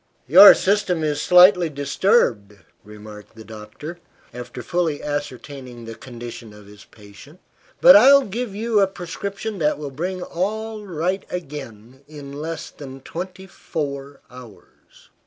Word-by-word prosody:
"Your 185 +10 +9
system 185 -4 0
is 150 -1 -1
slightly 180 0 +5
disturbed," 140 - 0 0.3
remarked 105 0 -13
the 110 - -12
doctor, 110 +10 -10 0.3
after 125 0 -9
fully 170 -4 -2
ascertaining 135 -4 -7
the 115 - -8
condition 120 -2 -10
of 105 -1 -15
his 105 +1 -16
patient, 105 - -17 0.4
"but - - +9
I'll 280 +1 +7
give 215 0 -5
you 220 0 0
a 195 - +3
prescription 200 +3 -7
that 150 -1 0
will 145 -2 -7
bring 180 +6 -5
all 215 +4 -4
right 180 +3 -2
again 130 -7 -9
in 145 -2 -11
less 160 +3 -6
than 135 -2 -11
twenty 185 +5 -8
four 140 -6 -6
hours." 125 -5 -17
150 Hz, 135 wpm, -21 LUFS, 125-185 Hz, 0.4 s, Your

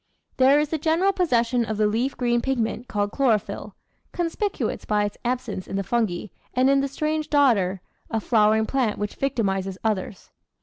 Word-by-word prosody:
There 270 +3 +5
is 300 -1 0
the 320 - -2
general 335 +6 +2
possession 245 -9 +1
of 220 -1 -3
the 215 - +3
leaf 230 +6 0
green 240 -1 +1
pigment 240 -2 -2
called 205 -2 -1
chloro 250 -5 +3
phyll, - - -8 0.4
conspicuous 355 +4 -2
by 210 -1 +1
its 205 0 -4
absence 240 -6 -3
in - - -5
the 195 - -1
fungi 210 -3 -1 0.3
and 260 +2 +4
in 275 - +4
the 275 - 0
strange 305 +2 -2
dodder, 210 -11 +3 0.3
a 225 - 0
flowering 220 0 +3
plant 245 -4 0
which 205 0 -3
victimises 195 -8 -1
others. 210 -3 -3
235 Hz, 175 wpm, -24 LUFS, 210-275 Hz, 0.4 s, There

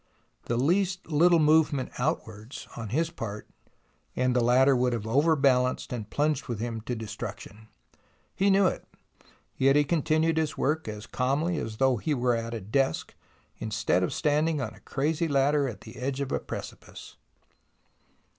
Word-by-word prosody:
The 120 - -1
least 180 +6 0
little 170 +3 +5
movement 150 -3 +3
outwards 115 -5 -4
on 115 -3 -6
his 165 +8 0
part 105 -9 -6 0.7
and 125 0 +1
the 125 - +3
ladder 130 +3 +5
would 125 0 +1
have 110 -2 -3
over 145 +8 +3
balanced 130 -3 +1
and 110 -3 -5
plunged 150 -1 0
with 120 -4 -4
him 115 -1 -3
to 125 - -1
destruc 110 -2 -6
tion. 110 +1 -13 0.7
He 195 +1 +2
knew 195 0 +4
it, - - 0 0.7
yet 135 +1 +4
he 150 - +5
continued 160 +1 +1
his 160 -1 -1
work 155 +1 0
as 105 0 -6
calmly 145 +8 0
as 110 -1 -5
though 130 -1 +3
he 150 +7 -1
were 125 -1 +1
at 115 0 -4
a 110 - -5
desk 110 0 -1 0.5
instead 105 -4 0
of 90 - 0
standing 150 0 +1
on 130 - -4
a - - -16
crazy 155 +4 -1
ladder 140 0 +2
at 105 -6 -7
the 110 +2 -12
edge 135 +1 -3
of 140 -2 -3
a - - 0
precipice. - - -9
135 Hz, 170 wpm, -27 LUFS, 115-155 Hz, 0.7 s, little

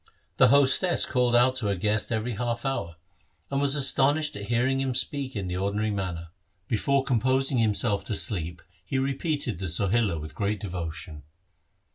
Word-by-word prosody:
The - - +6
hostess 140 +6 +3
called 125 -2 +1
out 130 +2 +4
to 115 -5 -2
her 100 - 0
guest 105 +4 -1
every 115 +1 -1
half 120 +2 -3
hour, 110 -11 -2 0.6
and 140 0 0
was 140 0 +3
astonished 145 +2 +3
at 100 0 -6
hearing 130 +3 +1
him 130 -2 -1
speak 135 0 0
in 100 -3 -3
the 90 0 -3
ordinary 100 +3 -1
manner. 90 -4 -4 0.4
Before 135 +5 +1
composing 130 +1 +1
himself 105 -1 +1
to 110 - -2
sleep 85 -5 -1 0.2
he 135 - -3
repeated 135 - -2
the 95 - -3
Sohila 100 +1 +1
with 75 +1 -8
great 105 0 -2
devotion. 85 -5 -6
115 Hz, 165 wpm, -26 LUFS, 100-135 Hz, 0.6 s, The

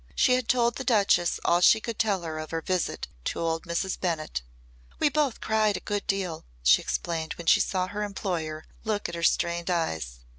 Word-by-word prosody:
She 255 - +4
had 250 -2 +1
told 240 -1 +2
the 265 - -4
Duchess 200 -7 +3
all 175 - +3
she 200 - +7
could 230 +1 -6
tell 205 -6 +1
her 160 -1 -4
of 155 - -6
her 165 0 -2
visit 185 -2 -1 0.2
to - - -2
old 165 -1 -1
Mrs. 170 +3 -2
Bennett. 155 - -2 0.6
"We 300 - +3
both 290 -4 0
cried 215 -2 +2
a - - -5
good 205 -1 -3
deal," 190 -5 -2 0.2
she 60 - +6
explained 165 -1 -2
when 170 - -9
she - - +6
saw 185 -1 0
her 205 +3 -5
employer 175 -6 -3 0.2
look 215 -2 -1
at 170 - -7
her 170 - -4
stained 170 +1 +1
eyes. 80 - -2
180 Hz, 200 wpm, -27 LUFS, 165-215 Hz, 0.6 s, she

